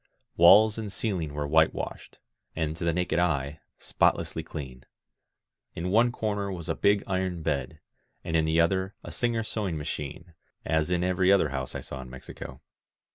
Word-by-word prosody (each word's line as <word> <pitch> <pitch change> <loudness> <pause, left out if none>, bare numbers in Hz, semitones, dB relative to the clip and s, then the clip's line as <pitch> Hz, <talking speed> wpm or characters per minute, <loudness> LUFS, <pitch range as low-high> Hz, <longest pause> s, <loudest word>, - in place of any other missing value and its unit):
Walls 105 +6 +7
and 105 -2 -5
ceiling 95 -9 -2
were 75 0 -2
whitewashed, 80 +2 0 0.4
and, 80 -1 -1
to 85 - -6
the 85 - +2
naked 90 0 0
eye, 75 -4 0 0.2
spotlessly 80 - 0
clean. 65 -6 -8 0.9
In 90 +2 -3
one 115 +4 +4
comer 105 -4 -2
was 85 -4 -6
a - - 0
big 100 0 +2
iron 95 -3 -2
bed, 75 0 -2 0.4
and 80 -2 -3
in 80 -1 +3
the 80 +1 +2
other 95 +3 +1
a - - -8
Singer 120 -2 0
sewing 100 -6 -3
ma 75 - -5
chine, 75 +3 -6 0.3
as 80 +1 +1
in 90 -1 +1
every 90 +1 +3
other 95 -6 +4
house 65 -1 -4
I - - -3
saw 65 - -7
in 65 - -10
Mexico. 65 +1 -10
85 Hz, 175 wpm, -27 LUFS, 80-95 Hz, 0.9 s, Walls